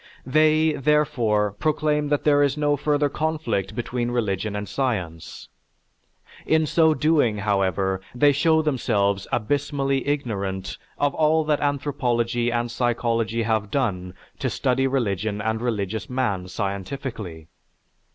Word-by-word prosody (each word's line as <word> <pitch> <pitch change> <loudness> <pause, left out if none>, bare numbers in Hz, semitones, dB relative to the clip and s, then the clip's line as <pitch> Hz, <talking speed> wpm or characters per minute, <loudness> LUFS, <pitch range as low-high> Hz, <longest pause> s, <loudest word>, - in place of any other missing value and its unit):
They, 155 +3 +3
therefore, 130 -8 +1
proclaim 150 +5 0
that 145 0 0
there 145 -1 +4
is 140 0 +2
no 145 -1 +2
further 145 +1 +1
conflict 140 - -2
between 120 0 -2
religion 105 -4 -1
and 105 0 -4
science. 90 - -3 1.0
In 160 0 +2
so 160 +1 +3
doing, 150 -9 +2
however, 95 -2 0
they 145 +4 +5
show 160 +3 +3
themselves 100 -9 0
abysmally 135 +2 -1
ignorant 100 -9 -3 0.2
of 145 -1 +1
all 160 0 +3
that 150 -1 +1
anthropology 120 -5 0
and 120 0 -1
psychology 115 -1 0
have 110 -2 0
done 95 -9 -2 0.2
to - - -1
study 135 0 +1
religion 110 -5 -1
and 110 +1 -1
religious 110 -3 -2
man 120 -8 -1
scientifically. 100 - -5
120 Hz, 120 wpm, -23 LUFS, 105-145 Hz, 1.0 s, they